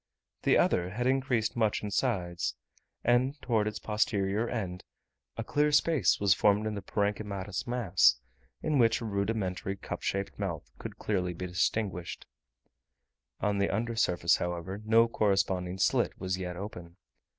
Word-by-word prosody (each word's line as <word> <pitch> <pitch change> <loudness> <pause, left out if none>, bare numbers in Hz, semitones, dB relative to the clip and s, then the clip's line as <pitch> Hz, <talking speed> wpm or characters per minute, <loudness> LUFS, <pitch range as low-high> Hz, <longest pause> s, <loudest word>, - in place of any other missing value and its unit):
The - - +4
other 90 0 +2
had 115 +6 -3
increased 130 -4 +1
much 110 -3 +1
in 105 - -3
size; 90 -7 -1 0.5
and 130 +4 +2
towards 110 -6 +1
its 105 0 -3
posterior 105 0 0
end, 95 -6 -4 0.5
a 115 - -2
clear 150 +5 +1
space 150 0 +3
was 100 -2 +5
formed 105 +1 +3
in 110 - -1
the 100 - -4
parenchymatous 100 0 -2
mass, 100 - +4 0.5
in 155 -3 +1
which 115 -1 +4
a - - -4
rudimentary 100 -2 -2
cup - - -6
shaped 100 +1 -3
mouth 80 -10 -4
could - - -7
clearly 90 -4 -1
be 90 - -5
distinguished; 90 0 -2 1.2
on 100 -1 +1
the 100 - +2
under 115 +3 -1
surface, 90 -6 +3
however, 90 +3 -4
no 115 +2 +5
corresponding 95 -4 0
slit - - +1
was 95 0 -1
yet 90 -1 -4
open. 90 -3 -8
100 Hz, 150 wpm, -30 LUFS, 95-115 Hz, 1.2 s, was